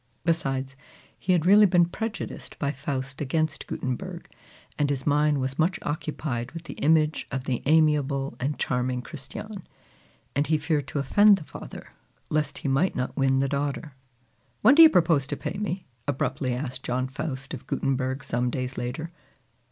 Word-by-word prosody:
Besides, 135 -5 0 0.4
he 185 - -1
had 175 -3 +3
really 205 +3 +7
been 175 -1 +5
prejudiced 215 +5 -5
by 140 -1 0
Faust 135 0 -4
against 155 +2 -1
Gutenberg, 130 -1 -4 0.5
and 145 -1 +2
his 135 -2 -1
mind 150 0 +3
was 130 +2 -3
much 175 +3 +2
occupied 145 -5 -3
with 165 0 -7
the - - -7
image 155 0 +2
of 135 -1 -3
the 130 -3 -2
amiable 145 -4 +2
and 140 +4 -1
charming 125 -1 -1
Christiane; 170 +9 -7 0.7
and 145 +2 +1
he 155 - +3
feared 150 -2 -1
to - - -4
offend 205 +9 +5
the 170 - -8
father - - -10 0.4
lest 150 -1 0
he - - -4
might 140 +8 +2
not 125 0 -2
win 135 0 +2
the 135 - +1
daughter. 140 +2 -2 0.7
"When 235 +6 +8
do 320 - +8
you 320 - +11
propose 160 - +3
to - - -3
pay 195 - -4
me?" 190 -3 -3 0.2
abruptly 130 -2 -1
asked 130 0 -4
John 130 +1 -1
Faust 135 -1 -5
of - - -8
Gutenberg 135 0 -1
some 120 +1 0
days 130 +1 -3
later. 155 +7 -4
145 Hz, 165 wpm, -26 LUFS, 130-160 Hz, 0.7 s, you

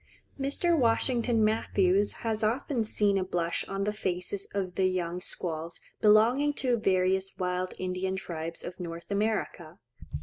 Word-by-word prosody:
Mr. 285 +5 +1
Washington 235 -3 +2
Matthews 200 -2 +2
has 220 -1 -1
often 240 +2 0
seen 205 -2 +2
a - - 0
blush 175 -2 -1
on 195 0 -2
the 210 +1 -1
faces 190 -1 -2
of 190 -3 -2
the 185 +1 +2
young 180 -1 -2
squaws 165 -2 -4 0.2
belonging 235 +8 +5
to 255 -3 +1
various 190 -2 +1
wild 180 0 -2
Indian 185 +1 -2
tribes 165 -3 -5
of 180 - -7
North 170 +1 -7
America. 200 -5 -2
195 Hz, 140 wpm, -29 LUFS, 180-220 Hz, 0.2 s, belonging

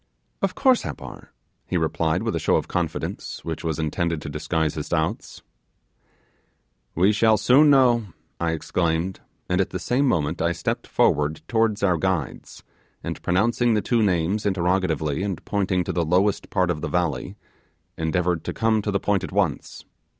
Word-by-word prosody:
'Of 195 -1 0
course 260 -3 +4
Happar,' - - -8 0.4
he - - 0
replied, 80 -1 0
with - - -1
a - - 0
show - - +2
of - - 0
confidence - - -4
which 80 -2 -4
was 80 -3 -2
intended 80 +1 -1
to 75 - -5
disguise 75 +1 -1
his 75 - -5
doubts. 85 +5 -2 1.5
'We 95 +5 +4
shall 110 +1 +4
soon 130 +8 +5
know,' 125 -5 +4 0.3
I 85 -1 0
exclaimed; 85 +2 -1 0.3
and 90 +1 +2
at 95 - -1
the 90 - -4
same 125 +9 +1
moment 80 - 0
I 85 +1 +1
stepped - - -3
forward 75 +1 +1
towards 110 -3 +1
our 90 -3 +3
guides, 90 -5 -3 0.4
and - - -5
pronouncing 115 +6 +2
the 105 - +1
two 120 +2 +1
names 95 +1 +1
interrogatively 90 -5 0
and 95 -4 -4
pointing 95 -3 0
to 95 - -3
the 85 0 +1
lowest 95 +5 +1
part 90 -3 +1
of 75 -3 -4
the - - -3
valley, 90 -2 -1 0.6
endeavoured 85 +1 0
to - - -3
come 110 -1 +1
to 105 - -3
the 100 -1 +1
point 100 -2 0
at - - -5
once. 90 -7 -2
90 Hz, 170 wpm, -24 LUFS, 80-105 Hz, 1.5 s, soon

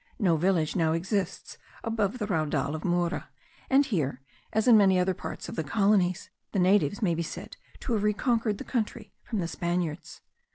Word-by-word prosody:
No 185 -8 +3
village 165 -1 +1
now 160 -3 +2
exists 190 +2 -2 0.2
above 225 -1 -1
the 215 - -2
Raudal 155 -6 0
of 155 - -5
Mura; 175 -1 0 0.4
and 275 +2 +5
here, 155 - -1 0.3
as 220 +3 +1
in 240 - +8
many 195 -3 +5
other 180 +1 +2
parts - - -7
of - - -6
the 160 - -1
colonies, 190 +1 +1 0.2
the - - 0
natives 200 +3 +3
may 175 -4 +3
be 165 - -1
said 165 - -7 0.3
to 245 - -2
have 215 - +1
reconquered 215 0 +1
the - - -6
country 220 -3 -3
from 225 - -4
the 175 -4 -1
Spaniards. 170 -2 -3
190 Hz, 180 wpm, -28 LUFS, 170-210 Hz, 0.4 s, in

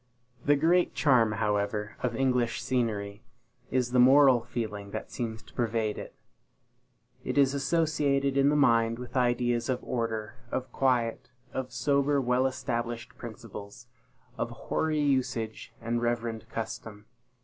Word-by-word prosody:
The 145 - +4
great 170 +5 +2
charm, 120 -7 +4
however, 105 0 -1
of 120 -2 -1
English 125 -3 +1
scenery, 110 -5 -2 0.5
is 125 -2 0
the 125 - +3
moral 130 -1 +7
feeling 110 -4 -4
that - - -6
seems 110 -3 -4
to - - -19
pervade 115 -3 -1
it. - - -9 1.1
It - - -3
is 140 -1 +4
associated 140 -2 +1
in 140 0 +4
the 150 - +2
mind 115 -5 +3
with 125 0 -9
ideas 120 -1 +1
of 125 -1 -1
order, 115 -1 -3
of 130 +1 -3
quiet, 125 -4 0 0.2
of 130 -1 -4
sober 140 +3 +2
well 125 0 +2
established 120 -2 -4
principles, 110 -2 -9 0.5
of - - -1
hoary 155 -1 -1
usage 125 -6 -1
and 115 +1 -2
reverend 115 -2 -2
custom. 110 -2 -6
120 Hz, 135 wpm, -29 LUFS, 115-135 Hz, 1.1 s, moral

